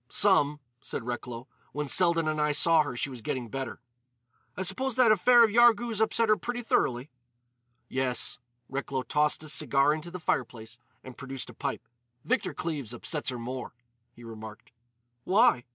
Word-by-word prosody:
"Some," 150 -7 +3 0.2
said - - -5
Recklow. 120 0 -6 0.3
"When 150 0 -3
Selden 170 0 +3
and 155 -1 0
I 150 0 +1
saw 165 +2 +5
her 145 -4 -4
she 135 +3 -2
was 125 -3 -9
getting 120 +1 -4
better." 135 +1 -5 0.8
"I 190 - -2
suppose 260 +6 -2
that 250 -4 +5
affair 235 +4 +6
of 220 - +3
Yarghouz 235 -1 +4
upset 225 +1 +2
her 215 0 +4
pretty 245 0 -4
thoroughly." 130 - 0 0.8
"Yes." 130 -1 -1 0.3
Recklow 135 -1 -3
tossed 150 +2 +1
his 155 -2 -4
cigar 140 +1 +2
into 155 +2 -6
the 180 +1 -7
fireplace 115 -7 -3 0.2
and 130 -1 -11
produced 135 0 -6
a - - -16
pipe. - - -5 0.4
"Victor - - -1
Cleves 140 -8 -4
upsets 150 +5 -2
her 125 - -4
more," 125 +2 -6 0.4
he 120 - -14
remarked. 110 -1 -10 0.5
"Why?" 195 - +3
150 Hz, 165 wpm, -28 LUFS, 125-190 Hz, 0.8 s, affair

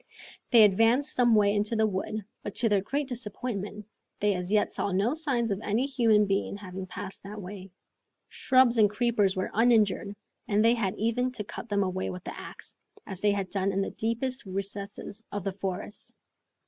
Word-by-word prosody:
They 230 -3 +8
advanced 225 +8 +4
some 240 -2 +4
way 205 -1 +4
into 210 +2 0
the 220 0 +3
wood, 210 +1 -3 0.2
but 205 - -6
to 230 - +2
their 205 -2 +3
great 280 +8 -2
disappointment, 210 -4 -4 0.3
they 205 0 +2
as 180 0 -4
yet 210 -1 +2
saw 200 - -2
no 200 +8 +1
signs 270 -8 -1
of 200 +1 -2
any 220 +5 0
human 230 -6 +3
being 195 0 -1
having 190 -2 -7
passed 190 +1 -7
that 205 +2 -8
way. 190 0 -8 0.6
Shrubs 255 -3 +3
and 210 -1 +6
creepers 210 -3 +1
were 185 - -2
uninjured, 215 -3 +3 0.3
and 210 +1 +2
they 230 - +6
had 205 -5 -1
even 235 +4 0
to 215 - -4
cut 215 - -8
them 200 -1 +2
away 185 0 -2
with 180 0 -7
the - - -6
axe, - - -10 0.3
as 190 -2 -8
they 205 -1 +3
had 195 -2 -3
done 195 0 0
in 195 0 0
the - - -4
deepest 230 +1 -2
recesses 200 +2 -5
of 205 -2 -4
the 195 -1 -2
forest. 195 +1 -5
210 Hz, 190 wpm, -28 LUFS, 195-230 Hz, 0.6 s, They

